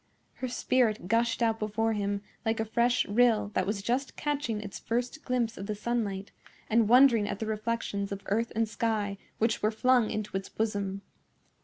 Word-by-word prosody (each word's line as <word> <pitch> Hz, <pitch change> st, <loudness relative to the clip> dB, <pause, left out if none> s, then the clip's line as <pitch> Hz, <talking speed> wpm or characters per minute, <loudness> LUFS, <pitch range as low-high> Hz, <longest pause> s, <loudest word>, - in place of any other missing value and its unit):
Her 255 Hz, -, -4 dB
spirit 240 Hz, -5 st, +1 dB
gushed 230 Hz, +2 st, +2 dB
out 225 Hz, -1 st, +1 dB
before 220 Hz, +1 st, 0 dB
him 200 Hz, -1 st, -2 dB, 0.2 s
like 225 Hz, -1 st, 0 dB
a 220 Hz, -, 0 dB
fresh 240 Hz, +3 st, +2 dB
rill 220 Hz, -1 st, +3 dB
that 185 Hz, -, 0 dB
was 200 Hz, -1 st, -2 dB
just 255 Hz, +5 st, -1 dB
catching 290 Hz, -7 st, -2 dB
its 205 Hz, -2 st, -7 dB
first 245 Hz, +6 st, -2 dB
glimpse 240 Hz, -3 st, -1 dB
of 195 Hz, -, -5 dB
the 210 Hz, -, -2 dB
sunlight 205 Hz, -3 st, -2 dB, 0.4 s
and 225 Hz, -1 st, +4 dB
wondering 240 Hz, -4 st, +6 dB
at -, -, -2 dB
the 220 Hz, -, -3 dB
reflections 215 Hz, -2 st, -2 dB
of 200 Hz, 0 st, -5 dB
earth 225 Hz, +3 st, 0 dB
and 225 Hz, 0 st, +2 dB
sky 210 Hz, -2 st, -1 dB, 0.2 s
which 225 Hz, 0 st, +1 dB
were 215 Hz, -, +3 dB
flung 245 Hz, +1 st, +3 dB
into 215 Hz, -2 st, -4 dB
its 195 Hz, 0 st, -3 dB
bosom. 200 Hz, -3 st, -2 dB
220 Hz, 180 wpm, -29 LUFS, 205-235 Hz, 0.4 s, wondering